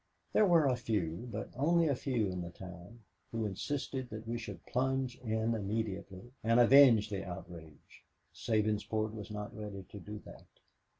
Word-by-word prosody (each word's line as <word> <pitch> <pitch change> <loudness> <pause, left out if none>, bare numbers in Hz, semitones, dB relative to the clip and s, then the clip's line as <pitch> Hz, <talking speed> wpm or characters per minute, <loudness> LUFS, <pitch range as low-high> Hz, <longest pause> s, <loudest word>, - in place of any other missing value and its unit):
There 215 - +5
were 170 -4 +5
a 130 -2 +3
few, 110 -3 -2
but 105 +1 -5
only 165 +5 +3
a 140 - +2
few 120 -7 0
in 90 -1 -3
the 85 - -5
town, 90 +5 -11 0.3
who 115 -1 -1
insisted 130 +5 -3
that 110 +1 -7
we 115 - -2
should 115 -1 -7
plunge 130 0 0
in 110 -1 0
immediately 105 0 -3
and 115 +2 +4
avenge 120 -4 +7
the 100 -2 -2
outrage. 85 -4 -10 0.3
Sabinsport 110 0 0
was 105 -2 -7
not 105 -1 -6
ready 105 -2 -6
to 100 - -10
do 105 +3 -7
that. - - -13
110 Hz, 165 wpm, -33 LUFS, 100-125 Hz, 0.3 s, avenge